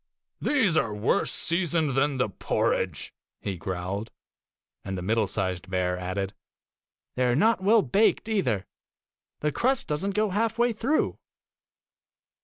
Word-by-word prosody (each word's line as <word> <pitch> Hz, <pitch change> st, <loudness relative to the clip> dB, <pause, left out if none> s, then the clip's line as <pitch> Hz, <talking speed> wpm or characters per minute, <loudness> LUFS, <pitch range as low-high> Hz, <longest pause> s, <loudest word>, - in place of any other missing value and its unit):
'They 260 Hz, -7 st, +3 dB
are 115 Hz, -7 st, -2 dB
worse 105 Hz, +3 st, +1 dB
seasoned 170 Hz, -3 st, +1 dB
than 135 Hz, +1 st, +1 dB
the 125 Hz, -, +2 dB
porridge,' 100 Hz, -, -1 dB, 0.3 s
he 100 Hz, -, -3 dB
growled; 95 Hz, +5 st, -4 dB, 0.7 s
and 95 Hz, 0 st, -4 dB
the -, -, -4 dB
middle 110 Hz, +2 st, +1 dB
sized 95 Hz, -2 st, -3 dB
bear 90 Hz, -1 st, 0 dB
added, 95 Hz, +2 st, -3 dB, 0.4 s
' -, -, -64 dB
They 125 Hz, 0 st, +2 dB
are 120 Hz, -, +2 dB
not 220 Hz, -, +3 dB
well 210 Hz, +2 st, +5 dB
baked 205 Hz, -, +2 dB
either. 125 Hz, -, 0 dB, 0.8 s
The 150 Hz, -, +1 dB
crust 255 Hz, -, +1 dB
does 150 Hz, +4 st, -1 dB
n't 200 Hz, 0 st, -2 dB
go 215 Hz, -1 st, +1 dB
halfway 230 Hz, +4 st, +1 dB
through. 265 Hz, +8 st, 0 dB
135 Hz, 140 wpm, -27 LUFS, -, 0.8 s, well